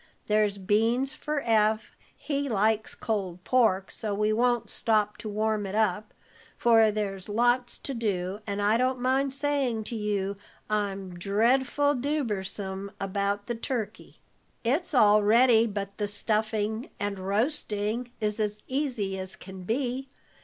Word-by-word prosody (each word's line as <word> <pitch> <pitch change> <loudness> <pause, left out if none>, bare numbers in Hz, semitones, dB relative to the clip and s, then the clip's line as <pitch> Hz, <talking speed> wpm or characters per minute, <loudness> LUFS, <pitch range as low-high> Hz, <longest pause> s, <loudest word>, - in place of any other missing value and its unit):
There's 210 -1 +2
beans 225 +8 +1
for 300 -1 -3
Eph; 220 -2 +1 0.2
he 285 -2 -2
likes 220 0 +1
cold 190 -5 -3
pork, 220 -7 +2
so 210 -2 -3
we 210 +1 +1
won't 240 0 +2
stop 210 -2 +1
to 220 - -6
warm 215 0 0
it 195 - -5
up, 210 -1 +1 0.5
for 225 -2 +5
there's 200 -2 -3
lots 240 +3 +2
to 275 - -5
do, 200 -4 -2
and 200 0 -2
I 210 +2 +4
don't 255 +1 +1
mind 265 +2 +1
saying 275 -5 0
to 230 - -5
you 200 -2 -1 0.3
I'm 195 -4 -2
dreadful 255 +9 +2
dubersome 205 -8 -2
about 200 +1 -1
the 240 - -2
turkey." 230 -1 -5 0.5
"It's 295 +7 0
all 210 -3 +6
ready 230 +2 +5
but 200 -1 -5
the 205 - 0
stuffing, 215 +2 -1
and 205 -1 -2
roasting 215 +2 -1
is 210 -1 -1
as 210 0 -2
easy 245 -9 -2
as 190 0 -6
can 190 -1 -10
be. 255 +4 -2
215 Hz, 140 wpm, -27 LUFS, 205-245 Hz, 0.5 s, all